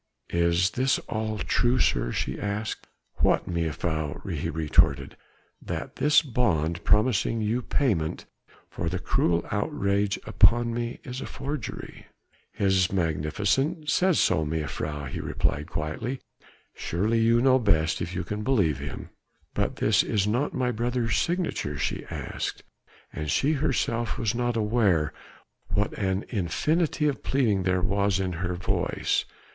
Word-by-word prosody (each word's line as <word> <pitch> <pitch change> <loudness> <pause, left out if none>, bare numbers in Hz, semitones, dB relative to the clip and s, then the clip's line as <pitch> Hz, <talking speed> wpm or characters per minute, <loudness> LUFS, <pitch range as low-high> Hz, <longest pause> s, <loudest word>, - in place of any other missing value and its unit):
"Is 85 +2 +3
this 130 +3 +2
all 110 0 -2
true, 120 +6 +1
sir?" - - +2
she 65 - -2
asked. 105 +2 -3 0.3
"What, - - +2
mejuffrouw?" 80 -2 -2
he - - -2
retorted. 70 -3 +2 0.5
"That - - -5
this 150 +2 +5
bond 85 - 0
promising 110 +1 +3
you 110 +4 0
payment 105 - 0 0.4
for 85 - -3
the 90 - -2
cruel 85 -1 +1
outrage 100 -3 0
upon 120 0 +4
me 120 0 -3
is 125 +1 -6
a - - -5
forgery?" 140 -4 -6 0.4
"His 95 -2 +2
Magnificence 95 - 0
says 185 -2 +3
so, 80 - +3
mejuffrouw," 75 -1 -3
he - - -5
replied 75 +2 -1
quietly, 80 - -3 0.5
"surely 105 +7 0
you 115 +1 +4
know 130 +1 +5
best 80 -8 +2
if 90 - -4
you 90 - -2
can 105 +5 -4
believe 100 - +2
him." 70 -1 -7 0.4
"But - - -1
this - - +3
is 100 -2 0
not 120 +7 0
my 125 -1 0
brother's 120 0 -1
signature?" 170 - -1
she - - -2
asked: - - -5 0.5
and 75 0 -4
she 135 - +2
herself 120 -5 0
was 110 -4 0
not 120 -1 0
aware 105 -9 +2 0.5
what 105 +1 0
an 95 -1 -1
infinity 150 - 0
of 140 - -1
pleading 115 -8 +1
there 90 0 +1
was 100 0 +1
in 95 -2 -1
her 90 +1 -2
voice. 90 - 0
100 Hz, 140 wpm, -26 LUFS, 85-120 Hz, 0.5 s, this